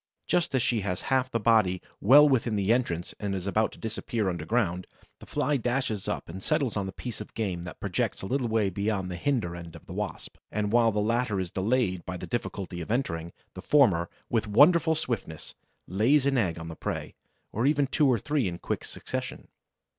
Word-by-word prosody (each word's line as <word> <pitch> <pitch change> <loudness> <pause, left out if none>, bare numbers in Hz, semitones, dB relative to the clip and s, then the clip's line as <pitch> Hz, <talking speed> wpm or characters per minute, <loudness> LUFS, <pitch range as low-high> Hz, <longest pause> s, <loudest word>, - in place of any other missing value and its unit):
Just 170 -5 +1
as 125 - +2
she 115 -3 +1
has 90 -2 -2
half 130 -1 +2
her - - +1
body 105 -5 +3 0.2
well 145 +8 +8
within 120 -5 +1
the 100 +2 +3
entrance 85 -9 -1
and 100 -2 -2
is 95 -1 -4
about 110 +2 +1
to - - -13
disappear 110 -2 -2
underground, 90 +1 -1 0.3
the - - -13
Fly 145 -1 0
dashes 120 -4 -1
up - - -3
and 95 +3 -7
settles 125 +4 0
on 100 -2 -1
the - - -4
piece 120 +2 -7
of 105 - -10
game 90 -6 -2
that 90 - -9
projects - - -2
a - - -3
little 130 +3 0
way 110 -3 +1
beyond 100 -1 -1
the - - -4
hinder 105 -4 -1
end 85 -1 -9
of - - -13
the - - -9
Wasp; - - -5
and 105 -1 -1
while 115 -1 +4
the 105 - -4
latter 110 -1 +1
is 90 -2 -3
delayed 95 -3 0
by 90 -1 -5
the - - -6
difficulty 95 -7 -4
of 80 - -7
entering, 85 -9 -1 0.2
the - - -8
former, 100 - +4 0.2
with 110 -3 0
wonderful 160 - +5
swiftness, 105 - -4 0.3
lays 120 - +3
an 140 -1 +2
egg 90 -10 +1
on 80 0 -7
the 80 - -7
prey, - - -4 0.4
or 115 +5 +1
even 145 -1 +3
two 140 +2 +2
or 125 -3 +4
three 140 +1 0
in 85 -1 -4
quick - - -3
succession. - - -6
110 Hz, 210 wpm, -28 LUFS, 95-125 Hz, 0.4 s, well